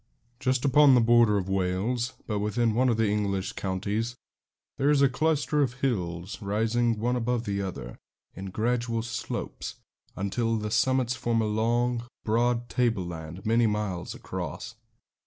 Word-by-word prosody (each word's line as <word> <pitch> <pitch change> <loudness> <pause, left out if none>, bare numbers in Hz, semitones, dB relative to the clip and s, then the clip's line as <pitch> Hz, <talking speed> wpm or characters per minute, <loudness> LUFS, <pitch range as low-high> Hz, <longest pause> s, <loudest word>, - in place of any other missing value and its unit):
Just 130 +1 0
upon 140 0 +6
the - - +6
border 115 -2 +5
of 95 -2 -2
Wales, 95 +7 -1
but 105 -2 -2
within 110 +2 +1
one 125 +3 +3
of 115 - +1
the 115 -1 +2
English 100 -2 -1
counties, 105 +5 -2 0.6
there 140 +1 +3
is 145 -1 +4
a - - +7
cluster 150 +2 +1
of 125 -4 0
hills, 95 -8 -2
rising 115 +3 +1
one 120 +3 0
above 120 -1 0
the 100 -1 -1
other 90 -11 -6 0.3
in 95 - -7
gradual 115 +2 -1
slopes, 115 +1 -5 0.4
until 115 +4 -1
the 105 0 -3
summits 125 +2 +2
form 115 0 0
a 110 - +1
long, 120 +3 +1 0.2
broad 120 +2 +1
tableland, 90 -8 -2
many 115 +1 +3
miles 105 -4 -2
across. - - -6
115 Hz, 150 wpm, -27 LUFS, 100-120 Hz, 0.6 s, a